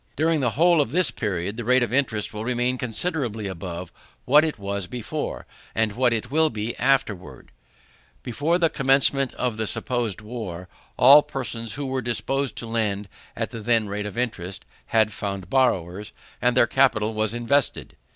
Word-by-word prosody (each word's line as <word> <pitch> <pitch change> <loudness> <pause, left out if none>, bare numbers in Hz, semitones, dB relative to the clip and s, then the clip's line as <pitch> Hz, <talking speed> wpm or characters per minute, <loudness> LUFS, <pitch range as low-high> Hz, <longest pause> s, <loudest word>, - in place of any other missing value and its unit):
During 160 +1 +2
the 125 -3 +1
whole 170 -1 +5
of 135 - -2
this 175 -6 +2
period, 100 -2 -3
the 120 - -4
rate 125 +2 +3
of 120 - -3
interest 115 -7 0
will 105 +1 -5
remain 125 +1 0
considerably 125 - -1
above 90 -2 -6 0.3
what 145 +4 +6
it 155 -4 -2
was 100 -2 -4
before, 120 +2 -5 0.3
and 110 -1 +1
what 125 +3 +2
it 115 +2 -3
will 160 +1 +3
be 110 0 -4
afterwards. 125 -8 -1 0.7
Before 145 +8 0
the 170 -2 +3
commencement 135 -1 +3
of 125 -4 -2
the 110 -1 -1
supposed 120 -5 -1
war, 105 -6 -7 0.3
all 135 +4 +9
persons 115 -6 -5
who 145 - -4
were 130 -1 -2
disposed 130 +2 -1
to - - -5
lend 105 -3 -2 0.3
at - - -3
the 115 - -6
then 115 -1 +1
rate 105 +1 -3
of 105 - -8
interest, 100 -7 -3 0.2
had 110 -1 +2
found 100 -3 -5
borrowers, 105 -6 0 0.3
and 125 0 +2
their 125 - +6
capital 115 -5 +2
was 110 +1 -1
invested. 125 +3 0
120 Hz, 170 wpm, -24 LUFS, 105-135 Hz, 0.7 s, all